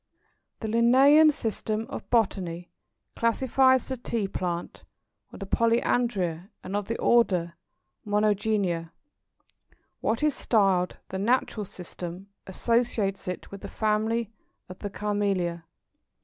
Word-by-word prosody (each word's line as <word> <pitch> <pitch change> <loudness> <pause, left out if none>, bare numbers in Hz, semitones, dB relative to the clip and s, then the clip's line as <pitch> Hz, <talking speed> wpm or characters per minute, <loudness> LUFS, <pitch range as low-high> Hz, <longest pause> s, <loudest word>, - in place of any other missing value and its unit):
The 220 - -3
Linnæan 265 +7 +6
system 220 -3 -3
of - - -8
Botany 180 -7 0 0.4
classifies 260 +2 +3
the 260 - -4
Tea 230 -3 -2
plant 175 -2 -4 0.5
with - - -12
the - - -3
Polyandria, 210 -6 0
and 190 - -5
of 205 -1 -2
the 230 - -2
order 180 -8 +2 0.5
Monogynia. 205 -5 0 1.1
What 230 +6 -1
is 300 -1 +3
styled 195 -7 +1
the 190 - -4
"Natural 220 -1 0
System" 180 +1 -9 0.2
associates 210 -1 0
it 180 - -5
with 200 0 -9
the - - -6
family 220 +1 0 0.4
of 185 - -11
the 205 - -4
Camellia. 195 -5 -1
210 Hz, 115 wpm, -27 LUFS, 185-230 Hz, 1.1 s, Linnæan